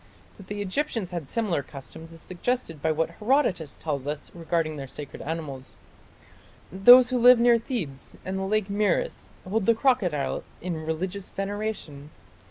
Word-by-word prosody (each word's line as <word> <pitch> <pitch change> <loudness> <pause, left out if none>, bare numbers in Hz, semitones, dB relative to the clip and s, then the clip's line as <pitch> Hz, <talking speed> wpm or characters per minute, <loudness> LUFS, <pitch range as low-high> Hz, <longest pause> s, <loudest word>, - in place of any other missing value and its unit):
" - - -28
That 195 - -13
the 205 0 -3
Egyptians 205 -2 -2
had 165 -6 -5
similar 210 -10 0
customs 145 +4 -10
is 165 -1 -13
suggested 185 - -3
by 160 - +2
what 165 +1 0
Herodotus 210 - +1
tells 145 -3 -3
us 150 0 -4
regarding 165 -2 -1
their 140 -2 -6
sacred 145 +2 -8
animals: 145 -4 -6 1.0
"Those 245 +7 +8
who 250 - +1
live 250 +1 +8
near 235 0 +5
Thebes 185 - -4
and 190 +1 -2
the - - -2
lake 210 0 +1
Moeris 210 - 0 0.2
hold 200 +1 -1
the 230 - +5
crocodile 210 - +1 0.2
in 165 -3 -4
religious 185 +4 -3
veneration.... 195 -8 -4
185 Hz, 160 wpm, -26 LUFS, 155-220 Hz, 1.0 s, Those